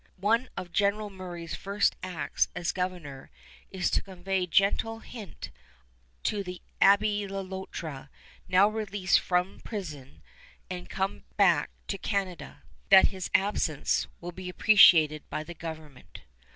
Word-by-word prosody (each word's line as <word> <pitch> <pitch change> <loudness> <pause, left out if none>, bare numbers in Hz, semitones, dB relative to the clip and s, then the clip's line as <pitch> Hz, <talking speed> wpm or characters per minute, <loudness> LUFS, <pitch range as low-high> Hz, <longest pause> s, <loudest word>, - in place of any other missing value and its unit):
One 230 +6 +1
of 175 - -6
General 205 +1 +1
Murray's 175 -3 -7
first 200 +1 0
acts 165 -6 -1
as 170 - -1
governor 175 -7 -5 0.4
is 190 -2 -1
to - - +2
convey 190 -1 -3
gentle 200 +6 +2
hint 215 -8 -9 0.7
to 205 -2 -1
the 180 -1 -7 0.2
Abbé 205 0 +4
Le 195 0 -3
Loutre, 185 -7 -7 0.4
now 185 +3 +5
released 205 -3 +1
from 180 +1 -1
prison 150 - -8 0.5
and 180 -1 -6
come 190 0 -3
back 175 -7 +4 0.2
to 195 - -3
Canada, 195 -4 -3 0.3
that 190 -1 +8
his 190 -2 -6
absence 190 -7 +1
will 175 +1 -6
be 180 +1 -7
appreciated 165 -7 +6
by 155 - -3
the 175 - -9
government. 155 - -9
185 Hz, 130 wpm, -28 LUFS, 170-200 Hz, 0.7 s, that